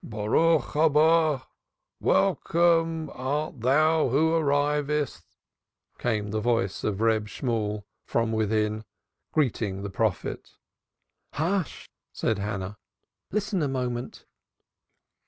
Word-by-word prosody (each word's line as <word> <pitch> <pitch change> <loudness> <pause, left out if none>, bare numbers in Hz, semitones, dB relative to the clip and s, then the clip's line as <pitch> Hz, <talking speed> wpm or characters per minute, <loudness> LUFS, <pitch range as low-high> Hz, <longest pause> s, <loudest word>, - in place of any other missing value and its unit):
"Boruch 115 +10 +1
Habo! 155 -1 +4 0.6
(Welcome 165 -1 +2
art 140 0 -3
thou 155 +5 +3
who 155 +6 +2
arrivest)" 150 -1 0 0.8
came 105 -4 -1
the 110 - -1
voice 115 -4 0
of 105 -1 -1
Reb 110 -2 +2
Shemuel 105 -3 -2 0.2
front 115 -1 0
within, 110 0 0 0.5
greeting 110 -9 0
the 100 - -5
prophet. 110 0 -2 0.8
"Hush!" 175 +2 -2 0.2
said 110 -3 -1
Hannah. 100 -1 -4 0.5
"Listen 210 -2 -1
a 145 - +1
moment." 125 -2 -4
130 Hz, 95 wpm, -26 LUFS, 110-155 Hz, 0.8 s, Habo